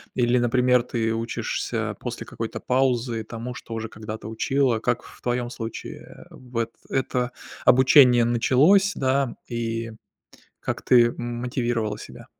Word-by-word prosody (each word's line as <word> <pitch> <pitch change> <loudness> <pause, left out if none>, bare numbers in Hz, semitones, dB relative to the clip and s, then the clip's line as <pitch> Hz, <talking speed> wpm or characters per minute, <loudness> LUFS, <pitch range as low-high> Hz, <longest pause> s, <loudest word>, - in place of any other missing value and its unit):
Или, 125 0 +2
например, 125 0 +3
ты 115 -2 -1
учишься 115 +1 -3
после - - -5
какой-то - - -6
паузы 125 -3 0
тому, 115 +2 -6
что 115 - -9
уже 110 0 -4
когда-то 110 0 -7
учила? 125 +1 +1
Как 125 +1 -1
в - - -15
твоем 120 0 -1
случае 115 -2 -8
в 125 -2 -10
эт 115 0 -1 0.2
это 125 -1 -1 0.3
обучение 125 -1 +7
началось, 145 - +4
да, 135 -1 0
и 115 -1 -3 0.7
как - - -4
ты 120 -2 +5
мотивировала 120 -2 -2
себя? - - -11
120 Hz, 130 wpm, -24 LUFS, 115-125 Hz, 0.7 s, обучение